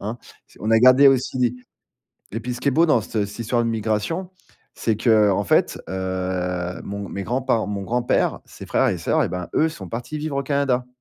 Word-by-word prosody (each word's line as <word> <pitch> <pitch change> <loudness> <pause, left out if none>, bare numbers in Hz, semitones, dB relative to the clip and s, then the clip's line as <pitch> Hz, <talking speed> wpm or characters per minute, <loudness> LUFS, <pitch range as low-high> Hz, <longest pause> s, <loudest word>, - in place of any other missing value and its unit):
hein? 110 +4 -5 0.3
C'est - - -22
on 110 - -2
a 115 - +6
gardé 130 +4 +7
aussi 125 -2 +2 0.8
et 115 - -3
puis 125 +2 -4
ce 125 - -8
qui 140 - 0
est - - +5
beau 165 +5 +4
dans 125 -7 +4
ce 105 -1 -2
cette 105 +3 -11
histoire 120 +1 0
de 115 - 0
migration, 115 - -2 0.4
c'est 110 -2 -1
qu'en 105 -3 +3
fait, - - +2
heu, 90 -1 -3
mon 100 0 -6
mes 100 - -4
grands-par 125 0 0
mon 100 -1 -4
grand-père, 120 +4 0
ses - - -11
frères - - +2
et - - 0
sœurs, - - +1
eh - - 0
ben, 90 -1 -5
eux, 160 - +3
sont 165 - -9
partis 120 +6 -5
vivre 150 -2 -3
au 140 - 0
Canada. 135 -3 0
115 Hz, 215 wpm, -22 LUFS, 100-130 Hz, 0.8 s, gardé